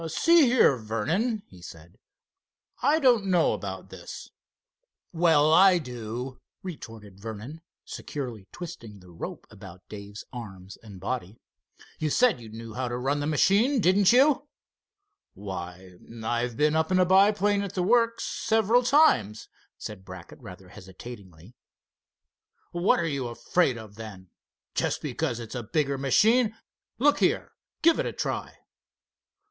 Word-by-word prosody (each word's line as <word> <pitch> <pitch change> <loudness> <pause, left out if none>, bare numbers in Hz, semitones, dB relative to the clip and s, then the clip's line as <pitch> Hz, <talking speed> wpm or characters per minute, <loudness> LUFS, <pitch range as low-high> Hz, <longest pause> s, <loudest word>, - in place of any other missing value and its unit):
"See 330 - +4
here, 240 - +4
Vernon," 160 - -2
he 90 -2 -16
said, 85 0 -13 0.8
"I 290 +4 +3
don't 240 -8 +3
know 180 -3 +3
about - - -6
this." - - -10 0.8
"Well, 160 -3 +4
I 185 +1 +7
do," 125 -2 -6 0.2
retorted 115 - -9
Vernon, 115 +9 -8 0.2
securely 120 -9 -7
twisting 115 - -9
the 90 -1 -16
rope 85 - -7
about 90 +2 -13
Dave's 100 0 -9
arms 100 -5 -9
and 100 -4 -12
body. 105 0 -4 0.6
"You 155 - -1
said 225 - +3
you 110 - -11
knew 115 0 -9
how 125 +2 -3
to 120 0 -3
run 135 +4 -1
the 145 - -2
machine, 200 - +3
didn't 190 +1 +4
you?" 275 +3 +4 0.9
"Why, 90 -2 -8 0.2
I've 120 +1 -2
been 150 +1 +2
up 160 +2 0
in 185 - +3
a 185 - +4
biplane 200 +2 +3
at 200 -1 -6
the 180 - 0
works 230 +3 +2
several 225 +2 +2
times," 245 - +3 0.3
said 105 -3 -8
Brackett, 95 -2 -11
rather 95 -5 -12
hesitatingly. 95 -1 -12 1.2
"What 175 +2 +2
are 170 - 0
you 140 -6 -2
afraid 120 +4 0
of, 110 -2 -11
then? 95 -5 -10 0.4
Just - - -1
because 140 -3 -2
it's 115 -2 -8
a 125 - -3
bigger 140 +4 -1
machine? 220 - +3 0.4
Look 290 +4 +3
here, - - +1 0.3
give 330 0 +5
it - - 0
a - - -4
try." - - -4
130 Hz, 140 wpm, -26 LUFS, -, 1.2 s, I